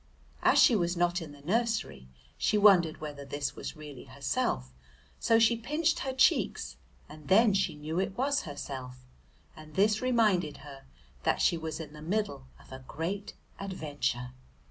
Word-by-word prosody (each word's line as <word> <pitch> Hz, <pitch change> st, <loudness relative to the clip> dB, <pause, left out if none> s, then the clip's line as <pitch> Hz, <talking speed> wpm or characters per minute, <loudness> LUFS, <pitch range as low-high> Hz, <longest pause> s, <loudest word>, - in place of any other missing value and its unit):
As -, -, +4 dB
she 240 Hz, -, +7 dB
was 175 Hz, -2 st, 0 dB
not 175 Hz, +1 st, +1 dB
in 155 Hz, -3 st, -8 dB
the 145 Hz, -1 st, -15 dB
nursery 205 Hz, -, -1 dB, 0.3 s
she 215 Hz, -, +1 dB
wondered 185 Hz, -7 st, +5 dB
whether 145 Hz, -2 st, -6 dB
this 140 Hz, 0 st, -4 dB
was -, -, -6 dB
really 150 Hz, -4 st, -10 dB
herself, 65 Hz, 0 st, -2 dB, 0.5 s
so 225 Hz, -, +4 dB
she 230 Hz, +1 st, +4 dB
pinched 300 Hz, +8 st, 0 dB
her 265 Hz, -, -2 dB
cheeks, 260 Hz, 0 st, +2 dB, 0.3 s
and 150 Hz, -1 st, -13 dB
then 215 Hz, +2 st, +5 dB
she 190 Hz, -5 st, 0 dB
knew 155 Hz, +3 st, -3 dB
it 195 Hz, 0 st, -2 dB
was 280 Hz, +2 st, +1 dB
herself, 130 Hz, -4 st, -7 dB, 0.5 s
and 155 Hz, -1 st, -13 dB
this 210 Hz, +2 st, +3 dB
reminded 215 Hz, -11 st, +2 dB
her 140 Hz, -2 st, -11 dB, 0.4 s
that -, -, +1 dB
she -, -, +3 dB
was 160 Hz, -1 st, -5 dB
in 155 Hz, -2 st, -8 dB
the 150 Hz, -, -11 dB
middle 175 Hz, -6 st, -2 dB
of -, -, -19 dB
a 130 Hz, 0 st, -9 dB
great 195 Hz, +6 st, -4 dB, 0.2 s
adventure. 145 Hz, -10 st, -3 dB
165 Hz, 165 wpm, -30 LUFS, 145-210 Hz, 0.5 s, she